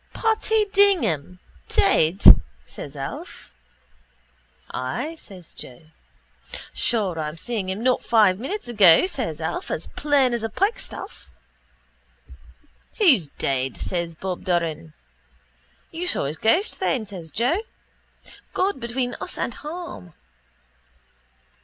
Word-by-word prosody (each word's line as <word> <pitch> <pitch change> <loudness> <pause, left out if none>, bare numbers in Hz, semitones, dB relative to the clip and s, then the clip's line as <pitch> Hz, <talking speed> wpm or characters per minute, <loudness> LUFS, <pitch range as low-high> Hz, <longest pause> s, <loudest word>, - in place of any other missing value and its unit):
—Paddy 445 -1 +2
Dignam 335 - +3 0.3
dead! 180 -1 +2 0.4
says - - -9
Alf. - - -7 1.2
—Ay, 245 - -3
says 180 -4 -11
Joe. 145 +5 -12 0.8
—Sure 200 -8 +1
I'm 150 -1 -3
after - - -13
seeing 210 0 -3
him 195 +4 -3
not 255 0 +2
five 210 -5 +4
minutes 370 - -4
ago, 210 - +6
says 250 - -4
Alf, 160 +1 -3
as 160 - -3
plain 280 -4 +2
as 235 - -1
a 225 - -2
pikestaff. 395 - -3 1.7
—Who's 265 - +5
dead? 130 -2 -2
says 170 -2 -3
Bob 185 +2 -5
Doran. 165 -3 -1 1.0
—You 340 +2 -4
saw 340 - +1
his 150 +3 -4
ghost 325 - +1
then, 260 -11 0
says 185 -5 -9
Joe, 245 - +1 0.9
God 385 -4 0
between 245 +1 -2
us - - -7
and 235 - -2
harm. 305 - -8
215 Hz, 115 wpm, -23 LUFS, -, 1.7 s, ago